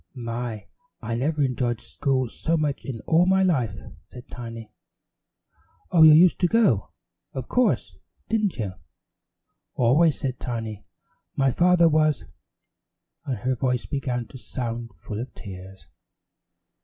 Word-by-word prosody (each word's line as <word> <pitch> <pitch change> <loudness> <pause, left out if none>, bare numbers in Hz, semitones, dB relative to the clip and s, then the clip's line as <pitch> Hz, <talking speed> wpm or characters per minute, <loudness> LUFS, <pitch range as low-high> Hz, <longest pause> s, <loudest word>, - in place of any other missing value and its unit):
"My, 115 -2 -5 0.4
I 115 - -3
never 145 +5 0
enjoyed 125 -3 -1
school 130 -3 -1
so 165 +8 -1
much 150 -3 -2
in 120 -5 -5
all 170 +3 +3
my 190 0 +4
life," 130 - +1 0.3
said 125 -1 -12
Tiny. 115 -2 -8 1.2
"Oh, 170 - +4
you 155 -1 +10
used 170 +3 +6
to 180 - +3
go, 175 - +2 0.4
of 130 -2 -5
course, 250 -1 +1 0.3
didn't 215 -4 0
you?" 105 -6 -3 1.0
"Always," 145 +6 +3
said 130 -2 -3
Tiny, 115 -4 -5 0.5
"my 135 -1 +2
father 175 +3 +4
was 155 -1 +2 0.5
" - - -55
and 130 -4 -1
her 130 +3 0
voice 125 -1 -1
began 125 -4 -3
to 130 - -11
sound 120 -2 -5
full 105 +6 -6
of 130 - -8
tears. 95 -1 -10
130 Hz, 135 wpm, -25 LUFS, 115-155 Hz, 1.2 s, you